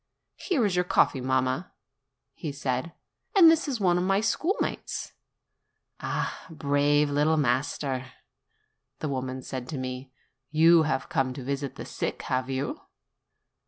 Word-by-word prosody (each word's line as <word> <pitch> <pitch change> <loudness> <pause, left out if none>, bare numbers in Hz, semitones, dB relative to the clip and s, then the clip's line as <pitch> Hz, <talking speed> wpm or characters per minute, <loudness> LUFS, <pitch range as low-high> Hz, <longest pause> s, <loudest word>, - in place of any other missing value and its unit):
"Here 290 - +1
is 195 -3 +1
your 180 - +3
coffee, 140 -6 +2
mamma," 130 +5 0 0.8
said 130 -2 -1
he; - - -14 0.5
"and 330 -3 +10
this 325 0 +1
is 260 -5 -2
one 180 -3 +3
of - - 0
my 195 +1 +2
schoolmates." 320 - -1 0.9
"Ah, - - -3
brave 145 -1 +2
little 150 +2 +3
master!" 135 -2 0
said - - -17 0.9
the 155 - -3
woman 130 -1 -3
to 130 +3 -5
me; 130 0 -5 0.4
"you 165 +2 +6
have 135 -3 -1
come 130 -1 0
to 135 -1 -7
visit 140 +1 -3
the - - -7
sick, - - -4
have 130 0 -1
you?" 135 +1 -3
145 Hz, 140 wpm, -27 LUFS, 130-170 Hz, 0.9 s, and